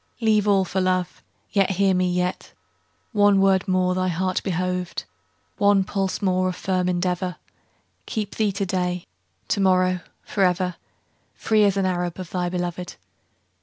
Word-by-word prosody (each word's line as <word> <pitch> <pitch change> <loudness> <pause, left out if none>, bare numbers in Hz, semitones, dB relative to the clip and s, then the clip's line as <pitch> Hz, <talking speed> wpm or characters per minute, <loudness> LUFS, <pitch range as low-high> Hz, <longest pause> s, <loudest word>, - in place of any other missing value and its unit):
Leave 215 -3 +2
all 195 -2 +4
for 190 +1 -1
love; 185 -1 -1 0.3
Yet, 195 -1 +2
hear 195 0 +2
me, 180 0 +1
yet, 180 +1 -2 0.6
One 205 -3 +4
word 195 0 +3
more 185 -1 +2
thy 185 0 0
heart 185 +1 -1
behoved, 180 -1 -2 0.6
One 200 -1 +4
pulse 195 +1 -2
more 185 -1 +2
of 180 - -4
firm 185 -1 0
endeavor, 180 0 -1 0.7
Keep 210 -3 -3
thee 215 -2 +1
to 195 +1 -2
day, 180 -1 -2 0.4
To - - +1
morrow, 185 -1 +3 0.2
forever, 180 -2 +1 0.6
Free 215 -1 +3
as 200 -1 +2
an 195 - +1
Arab 175 -2 -1
Of 180 -2 -7
thy 180 -1 -1
beloved. 180 0 -4
185 Hz, 150 wpm, -23 LUFS, 180-195 Hz, 0.7 s, all